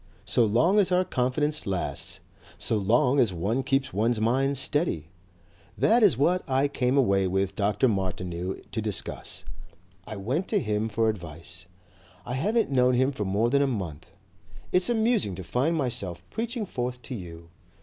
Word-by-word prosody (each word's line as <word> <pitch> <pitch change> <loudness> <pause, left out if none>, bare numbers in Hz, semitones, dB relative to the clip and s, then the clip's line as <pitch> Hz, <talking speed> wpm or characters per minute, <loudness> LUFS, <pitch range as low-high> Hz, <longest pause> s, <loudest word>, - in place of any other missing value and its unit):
So 115 +3 +3
long 125 - +3
as 195 -2 +2
our 180 +1 +3
confidence 145 - 0
lasts! 95 -2 -2 0.4
So - - 0
long 120 +6 +2
as 115 -6 +4
one 100 +9 -1
keeps 135 +1 0
one's 115 +3 +1
mind 135 +5 +1
steady. 130 - -1 0.7
That 235 +2 +4
is 195 - +5
what 175 +7 +2
I 135 +2 +2
came 130 -1 0
away 100 -7 +3
with 95 +1 -1
Dr. 105 +4 +2
Martineau 90 -3 -2 0.2
to 110 - -2
discuss. 105 -2 -4 0.6
I 110 - -6
went 130 - -2
to 210 - +1
him 105 - -1
for 110 +1 0
advice. 85 -2 -6 0.6
I 125 - -4
haven't 210 - +1
known 125 -1 +3
him 130 +3 +2
for 110 -7 -4
more 105 +5 +1
than 140 0 +3
a 140 - +3
month. 95 - -5 0.6
It's 180 +5 +3
amusing 220 - +1
to 95 - -7
find 135 - 0
myself 100 - -2
preaching 230 0 -3
forth 125 -6 -4
to 130 - -6
you. 85 -5 -9
120 Hz, 165 wpm, -26 LUFS, 95-140 Hz, 0.7 s, is